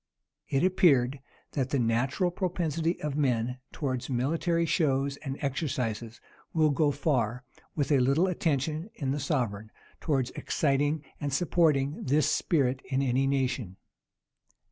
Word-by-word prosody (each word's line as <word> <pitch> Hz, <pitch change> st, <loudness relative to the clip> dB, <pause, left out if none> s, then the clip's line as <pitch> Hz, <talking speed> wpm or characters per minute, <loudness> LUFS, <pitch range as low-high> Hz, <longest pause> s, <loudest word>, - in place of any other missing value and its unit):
It 135 Hz, +3 st, +1 dB
appeared, 140 Hz, -8 st, +3 dB, 0.3 s
that 135 Hz, -3 st, -1 dB
the 140 Hz, -, +1 dB
natural 130 Hz, +9 st, +1 dB
propensity 170 Hz, -2 st, -1 dB
of 150 Hz, -2 st, -2 dB
men 125 Hz, -3 st, 0 dB
towards 130 Hz, -4 st, -3 dB
military 165 Hz, +7 st, +1 dB
shows 140 Hz, -4 st, +1 dB
and 135 Hz, -2 st, -5 dB
exercises 125 Hz, -5 st, -2 dB, 0.3 s
will 155 Hz, -2 st, +3 dB
go 145 Hz, +2 st, +2 dB
far, 130 Hz, -5 st, 0 dB, 0.3 s
with 145 Hz, -1 st, 0 dB
a 140 Hz, -, +5 dB
little 140 Hz, +8 st, +3 dB
attention 160 Hz, -, -1 dB
in 135 Hz, -4 st, -2 dB
the 145 Hz, -, -1 dB
sovereign, 120 Hz, -8 st, -2 dB, 0.3 s
towards 135 Hz, -6 st, 0 dB
exciting 145 Hz, +1 st, 0 dB, 0.2 s
and 145 Hz, -1 st, -2 dB
supporting 150 Hz, -2 st, +2 dB
this 145 Hz, +2 st, +2 dB
spirit 135 Hz, -5 st, +1 dB
in 135 Hz, 0 st, 0 dB
any 135 Hz, +1 st, +1 dB
nation. 130 Hz, -8 st, -1 dB
140 Hz, 130 wpm, -28 LUFS, 130-155 Hz, 0.3 s, a